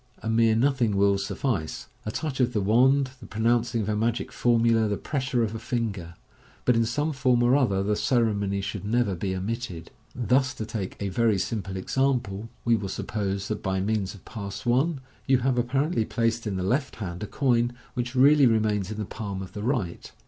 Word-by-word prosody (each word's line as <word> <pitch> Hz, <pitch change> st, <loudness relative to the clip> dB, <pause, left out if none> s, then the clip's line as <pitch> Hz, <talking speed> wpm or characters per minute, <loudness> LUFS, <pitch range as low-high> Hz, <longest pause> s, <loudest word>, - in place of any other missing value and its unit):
A 110 Hz, -, -2 dB
mere 115 Hz, -1 st, +4 dB
nothing 120 Hz, -4 st, +2 dB
will 100 Hz, 0 st, +3 dB
suffice 100 Hz, -, -2 dB
— -, -, -34 dB
a -, -, -1 dB
touch 145 Hz, +1 st, -3 dB
of 125 Hz, -1 st, +2 dB
the 110 Hz, -, +1 dB
wand, 130 Hz, +6 st, +4 dB
the -, -, -11 dB
pronouncing 115 Hz, +1 st, +1 dB
of 105 Hz, -, -3 dB
a 105 Hz, -, +1 dB
magic 115 Hz, +2 st, -1 dB
formula, 115 Hz, -2 st, +3 dB
the 105 Hz, -1 st, -1 dB
pressure 130 Hz, -4 st, -1 dB
of 110 Hz, -1 st, -2 dB
a 115 Hz, -, -4 dB
finger 105 Hz, -9 st, -3 dB
j -, -, -33 dB, 0.4 s
but 125 Hz, -, +4 dB
in 115 Hz, 0 st, +3 dB
some 145 Hz, +7 st, -1 dB
form 130 Hz, -3 st, +2 dB
or 120 Hz, +2 st, +4 dB
other 100 Hz, -9 st, +2 dB
the 105 Hz, +1 st, +1 dB
ceremony 105 Hz, -5 st, +1 dB
should 100 Hz, +1 st, -4 dB
never 110 Hz, -1 st, +1 dB
be 95 Hz, +2 st, -2 dB
omitted. 95 Hz, -3 st, -4 dB, 0.2 s
Thus, 130 Hz, +2 st, +1 dB
to 110 Hz, -, -4 dB
take 105 Hz, -4 st, -5 dB
a 100 Hz, -, -2 dB
very 110 Hz, +1 st, +2 dB
simple 95 Hz, -1 st, -3 dB
example, 115 Hz, -2 st, -1 dB, 0.2 s
we 120 Hz, -1 st, +4 dB
will 100 Hz, -3 st, -3 dB
suppose 100 Hz, -1 st, -3 dB
that 110 Hz, -, -3 dB
by 95 Hz, -1 st, -1 dB
means 100 Hz, 0 st, -1 dB
of 100 Hz, -, -16 dB
Pass 100 Hz, -3 st, -7 dB
I 135 Hz, +8 st, +2 dB, 0.3 s
you 135 Hz, -1 st, +5 dB
have 125 Hz, -1 st, +1 dB
apparently 135 Hz, +3 st, +1 dB
placed 115 Hz, 0 st, -1 dB
in 100 Hz, -, -2 dB
the 95 Hz, -, -2 dB
left 130 Hz, +9 st, 0 dB
hand 90 Hz, -3 st, -6 dB
a 105 Hz, -, -3 dB
coin, 120 Hz, -2 st, +1 dB, 0.2 s
which 125 Hz, +1 st, -3 dB
really 140 Hz, +1 st, +6 dB
remains 105 Hz, -4 st, +1 dB
in 110 Hz, -, -5 dB
the 105 Hz, -, -3 dB
palm 100 Hz, -2 st, -5 dB
of 95 Hz, -1 st, -11 dB
the 105 Hz, -, -5 dB
right. 110 Hz, -7 st, -2 dB
115 Hz, 205 wpm, -26 LUFS, 100-125 Hz, 0.4 s, really